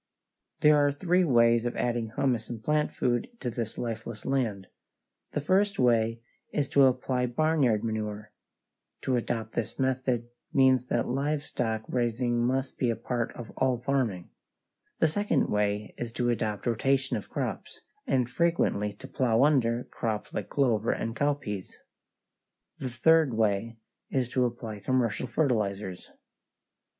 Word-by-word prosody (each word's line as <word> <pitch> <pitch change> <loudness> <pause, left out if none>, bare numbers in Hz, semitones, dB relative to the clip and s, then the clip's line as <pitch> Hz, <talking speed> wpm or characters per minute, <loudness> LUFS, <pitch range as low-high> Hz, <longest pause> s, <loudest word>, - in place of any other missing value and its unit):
There 150 0 +6
are 145 -1 +4
three 180 +5 +2
ways 115 -6 +4
of 120 - -4
adding 120 -2 -1
humus 125 -5 0
and 115 -2 -6
plant 150 0 +1
food 120 -1 0
to 125 - -3
this 115 -1 -4
lifeless 115 -1 -5
land: 115 -8 -1 0.7
the 150 - -1
first 200 +6 +2
way 115 -2 +2 0.3
is 145 -2 0
to 140 -1 +6
apply 125 -1 +1
barnyard 130 -4 +2
manure 105 -1 -3 0.7
(to 130 - +1
adopt 115 -2 -2
this 120 - -3
method 130 -3 0 0.2
means 130 -2 +4
that 120 - 0
livestock 130 -5 -1
raising 120 0 0
must 130 +2 -1
be 125 - +2
a 115 - +1
part 120 +1 -2
of 120 - -9
all 130 -2 +2
farming); 120 -8 -1 0.7
the - - +3
second 205 +7 +1
way 105 0 0
is 120 -1 -4
to 120 0 +1
adopt 110 -3 -2
rotation 135 +3 +1
of - - -5
crops, - - -4 0.3
and 125 -3 +2
frequently 125 -10 +1
to 115 +6 -11
plow 130 -3 +2
under 125 -5 +3
crops 110 -3 -4
like - - -4
clover 115 -5 +2
and 115 0 -3
cowpeas; 140 -10 -2 1.0
the 130 - -3
third 145 +2 +3
way 110 +1 0 0.3
is 130 -3 0
to 125 0 +2
apply 115 -3 -5
commercial 125 +1 0
fertilizers. 105 - -1
120 Hz, 140 wpm, -28 LUFS, 115-135 Hz, 1.0 s, There